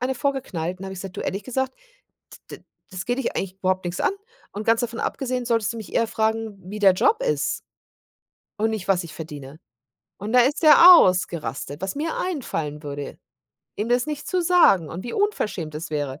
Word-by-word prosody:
eine 255 Hz, +2 st, -1 dB
vorgeknallt 190 Hz, -, -3 dB
und -, -, -10 dB
da -, -, -5 dB
habe 190 Hz, -, -6 dB
ich -, -, -9 dB
gesagt: 190 Hz, -1 st, -8 dB
„Du -, -, -4 dB
ehrlich 195 Hz, +2 st, -3 dB
gesagt, 260 Hz, +2 st, -2 dB, 0.8 s
d -, -, -7 dB
d -, -, -30 dB, 0.3 s
das 185 Hz, -1 st, -6 dB
geht 245 Hz, +1 st, -1 dB
dich 270 Hz, -, -2 dB
eigentlich 190 Hz, 0 st, -4 dB
überhaupt 185 Hz, -1 st, 0 dB
nix 175 Hz, 0 st, -4 dB
an -, -, +2 dB, 0.4 s
und 210 Hz, +1 st, -5 dB
ganz 230 Hz, 0 st, +3 dB
davon 235 Hz, -1 st, -3 dB
abgesehen 255 Hz, -2 st, -2 dB
solltest 230 Hz, -2 st, 0 dB
du -, -, -9 dB
mich 220 Hz, -3 st, -9 dB
eher 230 Hz, -, +2 dB
fragen, 220 Hz, -1 st, -1 dB
wie 210 Hz, -, -5 dB
der 195 Hz, -3 st, +5 dB
Job 440 Hz, -, +2 dB
ist 485 Hz, -2 st, -1 dB, 1.0 s
und 220 Hz, +1 st, +1 dB
nicht, 215 Hz, -4 st, -4 dB
was 190 Hz, -2 st, +2 dB
ich 165 Hz, -2 st, -10 dB
verdiene“ 150 Hz, -2 st, -9 dB, 0.6 s
und 210 Hz, +4 st, -5 dB
da 250 Hz, -, +7 dB
ist 275 Hz, +7 st, +1 dB
der 320 Hz, +3 st, +9 dB
ausgerastet, 160 Hz, -, 0 dB
was 190 Hz, 0 st, -3 dB
mir 315 Hz, +3 st, -2 dB
einfallen 160 Hz, -, -3 dB
würde, 145 Hz, -1 st, -6 dB, 0.6 s
ihm 210 Hz, +2 st, -2 dB
das 245 Hz, +2 st, +2 dB
nicht 300 Hz, -1 st, -5 dB
zu 365 Hz, -1 st, 0 dB
sagen 330 Hz, -, +4 dB
und 175 Hz, +3 st, -7 dB
wie 240 Hz, -, -5 dB
unverschämt 210 Hz, -, -1 dB
es 160 Hz, +1 st, -6 dB
wäre. 145 Hz, -2 st, -3 dB
210 Hz, 205 wpm, -23 LUFS, 175-255 Hz, 1.0 s, der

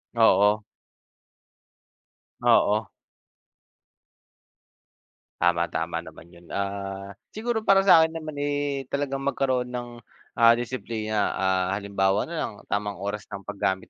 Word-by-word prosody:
Oo. 105 Hz, -2 st, +4 dB, 1.8 s
Oo. 105 Hz, +1 st, +3 dB, 2.5 s
Tama. 85 Hz, 0 st, +3 dB
Tama -, -, -2 dB
naman -, -, -13 dB
yun. 85 Hz, 0 st, -17 dB
Ah, 100 Hz, 0 st, -4 dB, 0.2 s
siguro 220 Hz, 0 st, -2 dB
para 195 Hz, -1 st, +6 dB
sa'kin 165 Hz, -4 st, +6 dB
naman 155 Hz, -2 st, -6 dB
eh 145 Hz, -1 st, -1 dB
talagang 140 Hz, -1 st, -2 dB
magkaroon 130 Hz, -3 st, 0 dB
ng, 120 Hz, -1 st, -4 dB, 0.5 s
ah, 115 Hz, 0 st, +7 dB
disiplina. 110 Hz, -3 st, -2 dB
Ah, 95 Hz, -1 st, +1 dB
halimbawa 100 Hz, 0 st, 0 dB
na 170 Hz, -, -5 dB
lang -, -, -2 dB, 0.2 s
tamang 105 Hz, -1 st, -2 dB
oras 100 Hz, +1 st, -4 dB
ng 100 Hz, -1 st, -7 dB
paggamit 95 Hz, -2 st, -2 dB
110 Hz, 110 wpm, -25 LUFS, 100-140 Hz, 2.5 s, ah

